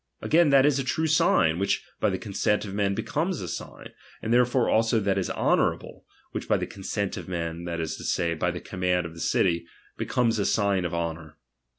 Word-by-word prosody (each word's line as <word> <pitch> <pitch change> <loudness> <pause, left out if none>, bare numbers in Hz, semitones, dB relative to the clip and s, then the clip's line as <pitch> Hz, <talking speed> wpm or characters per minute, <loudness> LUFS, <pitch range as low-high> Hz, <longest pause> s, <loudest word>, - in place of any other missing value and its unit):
Again, 165 0 +3
that 135 -1 +6
is 145 -2 +3
a - - 0
true 160 +5 -1
sign, 90 - +3
which 100 - 0
by 110 - +2
the 95 - -1
consent 105 +1 -1
of 100 - -7
men 100 -1 0
be - - -2
comes 170 +3 -1
a 90 - -5
sign; - - -7 0.3
therefore 120 +2 +3
also 115 +1 +3
that 100 -2 +1
is 95 - -2
honourable, - - 0 0.2
which - - -5
by - - +3
the - - -2
consent 100 0 -4
of - - -7
men, 85 -1 -4
that 85 -1 -3
is 80 -1 -3
to - - -9
say, 85 -1 0
by 90 +2 -1
the 90 0 -5
command 90 -1 -1
of 85 - -7
the 85 - -11
city, 85 -1 +1 0.3
becomes 115 -3 +1
a 100 - +1
sign 100 -3 +1
of 85 - -2
Jionour. 80 -2 -4
95 Hz, 215 wpm, -26 LUFS, 85-115 Hz, 0.3 s, that